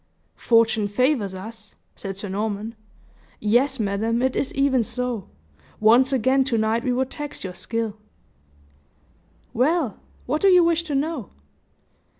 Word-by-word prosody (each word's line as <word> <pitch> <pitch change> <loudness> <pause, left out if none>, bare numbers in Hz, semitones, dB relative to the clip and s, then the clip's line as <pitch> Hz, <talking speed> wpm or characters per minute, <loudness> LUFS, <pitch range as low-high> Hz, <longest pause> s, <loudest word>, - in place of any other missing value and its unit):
"Fortune 225 -2 +3
favors 220 -3 +1
us," 215 +2 -10 0.2
said 195 -1 -7
Sir 200 - -5
Norman. 210 +2 -3 0.7
"Yes, 250 +5 +2
madam, 220 +3 0
it 260 0 +1
is 270 - -1
even 275 -2 +3
so; 245 -2 -3 0.5
once 240 +5 +5
again 265 +1 +3
to 250 -4 0
night 220 +2 +1
we 255 - 0
would 260 +1 -1
tax 295 -1 -6
your 185 -2 -5
skill." 225 +2 -3 1.6
"Well, 270 - +1 0.3
what 300 +5 -1
do 395 - +5
you 360 -2 +7
wish 335 -1 +2
to 295 -3 -3
know?" 280 - -2
235 Hz, 140 wpm, -23 LUFS, 215-270 Hz, 1.6 s, you